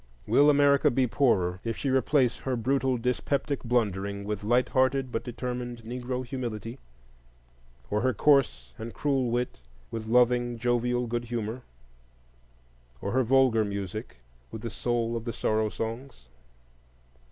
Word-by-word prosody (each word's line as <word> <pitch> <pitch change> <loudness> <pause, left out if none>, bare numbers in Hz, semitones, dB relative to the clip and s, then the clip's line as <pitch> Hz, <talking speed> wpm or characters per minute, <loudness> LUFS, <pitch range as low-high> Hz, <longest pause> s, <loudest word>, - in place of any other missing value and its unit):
Will 145 +1 +5
America 140 -1 +5
be 130 +1 +2
poorer 95 -9 +1
if 115 -1 -3
she 140 - -2
replace 130 -1 +2
her 130 -1 -2
brutal 130 +2 +1
dyspeptic 130 +4 -1
blundering 100 -4 -1
with 105 0 -4
light 120 +3 +2
hearted 130 0 +1
but 115 - -2
determined 125 -1 -5
Negro 125 +2 -4
humility? 120 -2 -5 1.1
or 105 +1 +1
her 130 +2 +2
coarse 130 - +2
and 115 +1 -7
cruel 135 -4 0
wit 120 - -2 0.3
with 110 -1 -5
loving 120 0 +3
jovial 120 0 0
good 120 +1 -3
humor? 115 +1 -4 1.4
or 100 - -3
her 130 +1 +2
vulgar 125 -2 +4
music 100 - -5 0.3
with 110 0 -7
the 115 - -4
soul 120 0 -1
of 115 - -3
the 115 -1 -4
Sorrow 110 0 0
Songs? 115 - -6
120 Hz, 140 wpm, -28 LUFS, 110-130 Hz, 1.4 s, Will